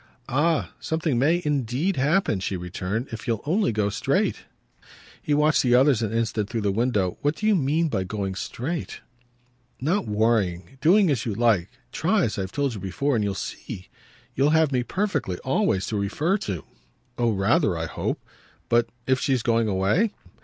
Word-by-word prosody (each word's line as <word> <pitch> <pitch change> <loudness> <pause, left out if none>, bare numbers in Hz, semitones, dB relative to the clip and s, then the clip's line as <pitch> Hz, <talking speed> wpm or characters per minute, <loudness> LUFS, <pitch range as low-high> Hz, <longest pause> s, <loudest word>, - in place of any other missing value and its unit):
"Ah 155 +4 +1
something 160 -6 -1
MAY 165 +7 +2
indeed 145 - 0
happen," 145 - +2
she 95 0 -2
returned, 90 +7 -4
"if 115 +2 -7
you'll 115 -3 -1
only 180 - +2
go 105 -2 0
straight!" 100 - 0 0.8
He 150 - +1
watched 150 +1 +3
the 125 -1 +3
others 130 -2 +4
an 110 -2 -1
instant 115 -2 -1
through 115 -2 -2
the 100 -1 +1
window. 105 -4 0
"What 145 +2 +1
do 215 - -4
you 215 -1 +4
mean 160 +1 +1
by 95 -11 -1
going 95 0 -3
straight?" 140 - -4 0.8
"Not 165 - 0
worrying. 105 0 0
Doing 180 +2 +5
as 125 -4 -1
you 105 - -2
like. 105 -6 +2 0.2
Try, - - +1
as - - -1
I've 95 0 -3
told 140 0 -1
you 105 - -6
before, 95 - -1
and 110 - +1
you'll 100 -1 -1
see. 95 -1 -7 0.4
You'll 140 +3 +2
have 160 -1 +3
me 125 -2 +1
perfectly, 145 - -2
always, 130 - +1
to 110 - -2
refer 145 - 0
to." 95 - -4 0.6
"Oh 120 -1 +3
rather, 95 -2 +2
I - - -2
hope! - - -3 0.5
But 120 0 +3 0.2
if 130 0 +2
she's 130 -4 +1
going 115 -1 +2
away?" 105 - +1
120 Hz, 175 wpm, -25 LUFS, 105-150 Hz, 0.8 s, Doing